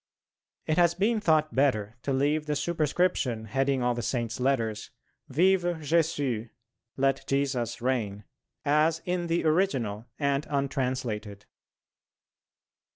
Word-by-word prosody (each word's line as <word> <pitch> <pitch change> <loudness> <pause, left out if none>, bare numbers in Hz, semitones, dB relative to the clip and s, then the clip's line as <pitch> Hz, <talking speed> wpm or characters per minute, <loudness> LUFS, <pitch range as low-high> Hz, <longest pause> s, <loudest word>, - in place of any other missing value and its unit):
It 155 +2 +1
has 170 -1 +4
been 215 +5 +1
thought 155 -6 +2
better 115 -6 +1
to 140 - -2
leave 145 +3 +1
the 150 - 0
superscription 155 -7 0
heading 135 +3 0
all 125 0 +2
the 120 - -3
Saint's 120 -1 -2
letters, 115 -5 0 0.4
"Vive 185 +7 +3
Jésus" 155 -8 0 0.5
(Let 135 0 +1
Jesus 135 -4 -1
reign), 110 -6 -1 0.4
as 155 +3 +2
in 180 -1 -1
the 165 0 0
original, 130 - +1
and 140 0 0
untranslated. 125 -7 -2
140 Hz, 115 wpm, -28 LUFS, 120-160 Hz, 0.5 s, has